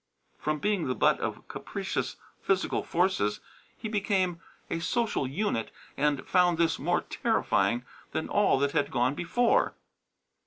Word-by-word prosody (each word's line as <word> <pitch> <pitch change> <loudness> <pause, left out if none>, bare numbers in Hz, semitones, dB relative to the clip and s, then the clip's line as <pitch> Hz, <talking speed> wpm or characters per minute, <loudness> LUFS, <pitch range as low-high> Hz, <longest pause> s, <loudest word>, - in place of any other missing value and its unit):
From 155 0 -1
being 195 +1 0
the 125 - 0
butt - - +3
of - - -4
capricious - - -3 0.3
physical 195 -1 +1
forces 165 - +1 0.4
he 225 - -5
became 195 -5 0 0.3
a 165 - -2
social 220 - 0
unit 140 - -1 0.3
and 145 -1 0
found 180 -2 +4
this 165 -1 +2
more - - +1
terrifying 120 +1 +1 0.3
than - - -2
all 205 -8 +3
that 140 +1 +1
had 145 -2 +1
gone 125 +1 +1
before. 230 +10 +2
165 Hz, 140 wpm, -29 LUFS, 140-195 Hz, 0.4 s, found